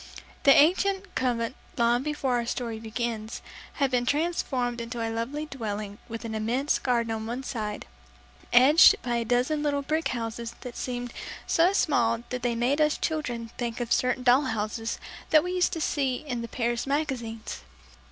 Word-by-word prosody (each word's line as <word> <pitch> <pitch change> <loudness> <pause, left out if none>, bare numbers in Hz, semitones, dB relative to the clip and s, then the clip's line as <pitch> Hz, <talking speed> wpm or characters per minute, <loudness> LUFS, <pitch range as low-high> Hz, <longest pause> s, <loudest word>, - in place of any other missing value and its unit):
The 275 - +9
ancient 380 +5 +3
convent 240 -2 -1 0.2
long 235 0 +3
before 275 -3 -1
our 235 - -1
story 230 -2 -3
begins 225 0 -4 0.3
had 275 -3 0
been 245 -1 +1
transformed 265 -6 0
into 235 +1 -5
a 225 0 -2
lovely 265 +7 -3
dwelling 210 -7 -5
with 230 +1 -6
an 225 - -4
immense 240 +7 0
garden 235 -3 0
on 220 0 -3
one 245 +3 -4
side, 215 -6 -4 0.7
edged 270 +7 +7
by 240 -1 0
a 235 - 0
dozen 250 +6 +1
little 285 -1 0
brick 315 +3 0
houses 235 -1 -4
that 245 -2 -8
seemed 245 -1 -4 0.3
so 340 +3 +4
small 235 - +2
that 250 0 -3
they 240 -1 0
made 255 +6 +1
us 300 0 +3
children 245 -8 -3
think 240 -1 -3
of 240 -1 0
certain 255 0 +1
doll 255 +3 +5
houses 225 -1 -2 0.3
that 310 -1 +6
we 360 - -3
used 360 -1 +2
to 330 - -2
see 270 -4 0
in 245 -3 -4
the 235 - -5
Paris 240 +1 -1
magazines. 260 -6 -3
245 Hz, 170 wpm, -27 LUFS, 230-285 Hz, 0.7 s, The